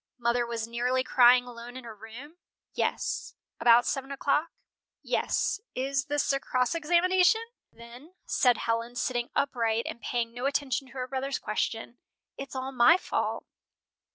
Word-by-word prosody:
"Mother 240 0 +1
was 230 -1 -3
nearly 250 +2 0
crying 250 -1 +6
alone 245 0 -9
in 260 - -9
her 230 -2 -9
room?" 235 +10 -11 0.4
"Yes." - - -2 0.2
"About 240 0 +6
seven 270 0 -2
o'clock?" 290 +3 0 0.5
"Yes. - - 0 0.2
Is 270 +1 -1
this 290 -1 0
a 275 - 0
cross 250 0 0
examination?" 360 +6 +3 0.3
"Then," 240 +9 -14
said 245 -2 +3
Helen, 230 +1 -2
sitting 240 -1 -1
upright 230 -4 0
and 235 - -6
paying 235 -2 -2
no 245 +3 -2
attention 275 -2 -1
to - - -17
her 255 -1 -4
brother's 270 +1 -2
question, 225 +2 -3 0.4
"it's 275 -1 -8
all 260 +1 -3
my 265 +7 +6
fault." - - -2
255 Hz, 150 wpm, -28 LUFS, 235-275 Hz, 0.5 s, crying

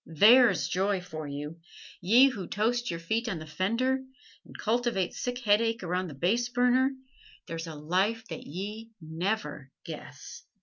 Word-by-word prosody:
There's 225 - +5
joy 195 +2 0
for 160 -4 -7
you! 145 +3 -6 0.4
ye 235 +9 +6
who 200 -9 -6
toast 235 +4 0
your 170 - -3
feet 220 +8 -1
on 185 - -2
the 155 - -8
fender 230 +11 0 0.4
and - - -13
cultivate 230 -4 0
sick 245 0 -3
headache 225 0 +2
around 180 +1 -1
the 150 - -9
base 225 - +1
burner 250 +2 +3 0.6
there's 165 0 -5
a 160 - -7
life 190 +9 0
that - - -6
ye 210 +8 -6
never 160 -3 -3 0.2
guess! - - -9
200 Hz, 150 wpm, -29 LUFS, 165-235 Hz, 0.6 s, ye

